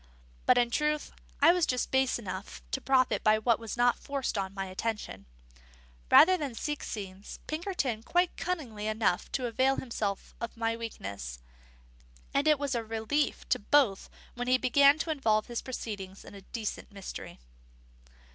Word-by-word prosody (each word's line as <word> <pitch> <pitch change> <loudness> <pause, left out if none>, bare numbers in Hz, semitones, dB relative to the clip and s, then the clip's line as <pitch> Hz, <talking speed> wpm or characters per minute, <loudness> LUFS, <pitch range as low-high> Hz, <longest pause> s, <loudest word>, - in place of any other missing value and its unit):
But, - - +6
in 240 -1 +3
truth, 300 +2 0 0.3
I 325 - +9
was 355 -2 +2
just 250 -1 -1
base 265 -1 +2
enough 195 -3 -7
to 270 - -1
profit 260 -1 +2
by 215 0 +5
what 225 +1 +2
was 225 0 -6
not 245 0 +3
forced 275 -3 -3
on 195 -2 -2
my 195 -1 -4
attention, 190 - -4 0.8
rather 370 +3 +8
than 280 -8 -4
seek 295 +5 -3
scenes: 195 -2 -7
Pinkerton 310 - -2
quite 350 +8 +1
cunning 315 -11 -3
enough 215 -3 0
to 255 - 0
avail 260 +3 +2
himself 215 -7 -3
of 235 0 -5
my 230 0 0
weakness; 100 - -6 1.0
and 280 +2 +2
it 305 -1 +6
was 280 -1 -2
a 235 -2 -1
relief 225 +6 -1
to - - +2
both 225 -3 +2 0.2
when 245 0 -4
he 255 0 +5
began 280 +3 +5
to 325 0 -2
involve 220 -8 +2
his 240 -1 -4
proceedings 200 -6 -6
in - - -11
a 200 - -10
decent 215 +2 -5
mystery. 195 -2 -8
235 Hz, 165 wpm, -30 LUFS, 215-280 Hz, 1.0 s, I